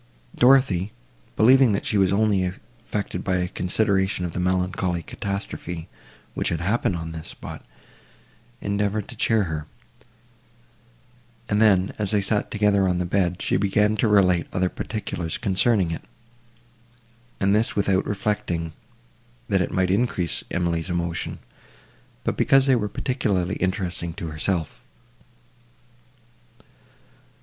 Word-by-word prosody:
Dorothée, 125 -8 +4 0.5
believing 125 0 +6
that 100 - -2
she 105 - +1
was 95 -1 +3
only 100 -2 +2
affected 105 0 -5
by 95 - 0
a 90 0 0
consideration 95 0 0
of 85 - -5
the - - -3
melancholy 90 -1 0
catastrophe, 95 -4 -5 0.5
which - - -1
had 85 - -1
happened 100 +3 0
on 80 -1 -5
this 80 -1 -7
spot, - - -9 1.0
endeavoured 100 0 -1
to - - -8
cheer 110 -2 +2
her; 80 -4 -4 1.8
and 105 0 +1
then, 95 -3 +4
as 105 -2 +1
they 105 - +3
sat 105 +1 -1
together 105 -2 +2
on 90 -1 +1
the 90 - -1
bed, 90 0 0
she - - +1
began 105 +2 +2
to 115 - +2
relate 90 -5 +3
other 90 0 +1
particulars 90 -7 -4
concerning 100 -3 +2
it, 80 - -4 1.4
and 100 0 +2
this 110 +2 +1
without 95 -2 +1
reflecting, 95 -6 -2 0.8
that 95 -2 +3
it 90 - -1
might 95 -1 +1
increase 100 -5 0
Emily's 85 0 -1
emotion, 85 -1 -2 0.9
but - - -1
because 135 -1 +4
they 135 -2 +4
were 105 -3 -1
particularly 100 -7 -1
interesting 90 -3 -2
to 85 -4 -6
herself. 80 +1 -2
95 Hz, 130 wpm, -24 LUFS, 90-105 Hz, 1.8 s, believing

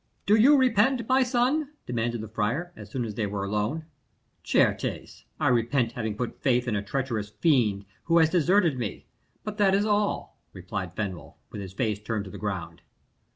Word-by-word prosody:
"Do 205 - +5
you 270 +7 +6
repent, 250 -1 +3
my 260 +1 +4
son?" 260 +4 +1
demanded 120 -1 -2
the 110 - -6
friar, 115 - -2
as - - -11
soon 130 -4 -2
as 110 - -5
they 105 0 -1
were 100 0 -3
alone. 105 +10 -2 0.6
"Certes, - - 0
I - - +1
repent 120 0 +2
having 110 -3 -4
put 125 0 -4
faith 125 -2 +2
in 115 - 0
a 100 - 0
treacherous 115 -2 -3
fiend, 105 - +1 0.2
who 165 0 +3
has 160 -1 +5
deserted 175 -4 +3
me 110 -5 -4 0.4
but 210 0 -6
that 195 -2 +4
is 200 +1 +2
all," 210 -1 0
replied 95 -1 -5
Fenwolf, 95 -5 -5 0.2
with 105 - -6
his 95 -1 -8
face 105 -1 -1
turned 105 -1 -3
to 95 - -9
the - - -9
ground. 95 -5 -4
120 Hz, 185 wpm, -27 LUFS, -, 0.6 s, you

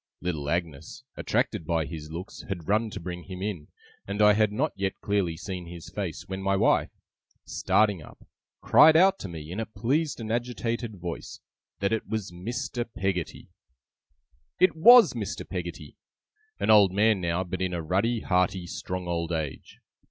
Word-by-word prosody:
Little 80 -5 -3
Agnes, 80 -3 -3
attracted - - -1
by 80 -1 0
his 75 0 -8
looks, 85 +4 -7
had 90 -5 -5
run 110 +2 +2
to - - -7
bring 90 0 -7
him 95 0 -7
in, 95 -8 -4 0.4
and 100 +1 -4
I 105 0 +7
had 105 0 +2
not 140 +8 0
yet 95 0 -3
clearly 95 -5 -1
seen 90 -1 -6
his 85 -1 -10
face, - - -4
when 95 0 -5
my 100 0 +1
wife, - - +3 0.6
starting 105 -5 +1
up, - - -15 0.4
cried 160 +1 +7
out 190 +3 +5
to - - -6
me, 80 -1 -8
in 95 - -4
a 115 - -3
pleased 135 +9 -1
and 110 -1 -5
agitated 120 -1 -2
voice, 85 -2 -7 0.4
that 100 +2 +1
it 110 - -2
was 110 -4 -3
Mr. 120 +7 -4
Peggotty! 95 -3 -3 1.1
It 185 -2 +4
WAS 240 +9 +8
Mr. - - -5
Peggotty. - - -6 0.6
An - - +2
old 100 -3 +7
man 105 0 +3
now, 85 +1 0
but 95 0 -5
in 95 -1 0
a 85 -2 -3
ruddy, 105 +8 0
hearty, 90 0 +1
strong 90 +1 -5
old 85 -1 -2
age. 80 -4 -5
95 Hz, 170 wpm, -27 LUFS, 85-110 Hz, 1.1 s, WAS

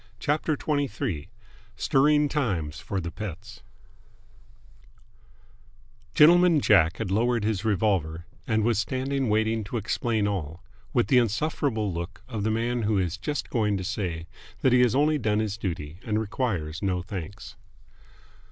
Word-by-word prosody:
CHAPTER 150 +3 0
XXIII 140 - -2 0.5
STIRRING 150 +2 +3
TIMES 95 - -2
FOR 100 - -3
THE 85 -2 -4
PETTS 105 +2 -8 2.5
Gentleman 170 +1 +6
Jack 85 - +4
had 110 -4 -3
lowered 115 +2 +1
his 105 -2 -1
revolver, 95 -7 0 0.2
and 110 -2 +1
was 115 -1 +2
standing 130 +2 -1
waiting 110 +1 +1
to 120 - -4
explain 110 0 0
all, 90 -2 -4 0.3
with 120 - +2
the 130 - +5
insufferable 115 - 0
look 85 +3 -6
of 115 -5 -4
the 110 - +1
man 115 +2 0
who 105 -1 +1
is 90 -3 0
just 145 +10 -4
going 105 -4 +1
to 95 - -4
say 90 -4 -3 0.4
that 130 - +4
he 125 - +5
has 125 0 +3
only 150 +2 +3
done 105 -4 +1
his 105 -2 -1
duty 85 -6 -5
and 110 -1 0
requires 100 - -2
no 90 -3 -1
thanks. 95 +1 -7
110 Hz, 145 wpm, -26 LUFS, 95-125 Hz, 2.5 s, Gentleman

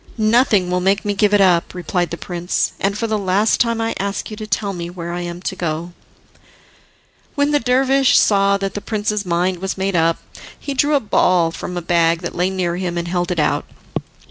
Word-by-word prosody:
"Nothing 215 -4 +3
will 180 - +1
make 195 +3 +1
me 205 - 0
give 205 0 +2
it 205 -1 +4
up," 180 -2 +3
replied 175 0 -1
the 170 - -5
prince, 175 0 -2
"and 200 +1 0
for 230 - -1
the 220 -1 -1
last 200 +3 +2
time 230 -1 +1
I 225 0 -1
ask 200 +2 -3
you 215 - -7
to 215 0 -6
tell 200 -1 -1
me 170 -1 -5
where 170 -1 -6
I 175 - -3
am 175 +1 -6
to 190 - -3
go." 170 0 -3 1.4
When 285 +1 +1
the 295 - +3
dervish 265 +2 +3
saw 200 -1 +4
that 195 0 -3
the 205 - -4
prince's 210 -2 -2
mind 175 +1 0
was 190 +1 -3
made 190 0 -1
up, 165 0 +2 0.4
he 280 - -4
drew 290 +3 +2
a - - +4
ball 180 -7 +2
from 180 +1 -6
a 175 - -4
bag 165 -1 +2
that 170 - -4
lay 180 +2 0
near 180 -2 -2
him, 180 -2 -3
and 170 0 -2
held 175 -1 -1
it 180 - -2
out. 150 - +1
190 Hz, 220 wpm, -19 LUFS, 175-215 Hz, 1.4 s, it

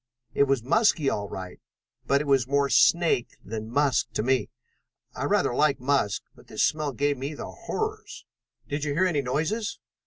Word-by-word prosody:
It 140 - +4
was 135 -4 0
musky 155 - +3
all 100 -1 -3
right, 95 -1 -7 0.5
but 140 0 +3
it - - -4
was 135 -3 +2
more 140 0 +2
snake 170 -8 +3
than 110 +1 -5
musk 140 +1 +1
to - - -1
me. 130 +1 +1 0.6
I - - -3
rather - - +2
like 145 +2 +2
musk, 130 -5 0
but - - -19
this - - -1
smell 155 -2 +1
gave 145 +1 0
me 140 +3 -4
the - - -7 0.2
horrors." 435 0 -4 0.4
"Did 145 0 -3
you 145 -1 -1
hear 185 +4 +3
any 165 -6 +1
noises?" 160 - -2
140 Hz, 180 wpm, -26 LUFS, 125-155 Hz, 0.6 s, It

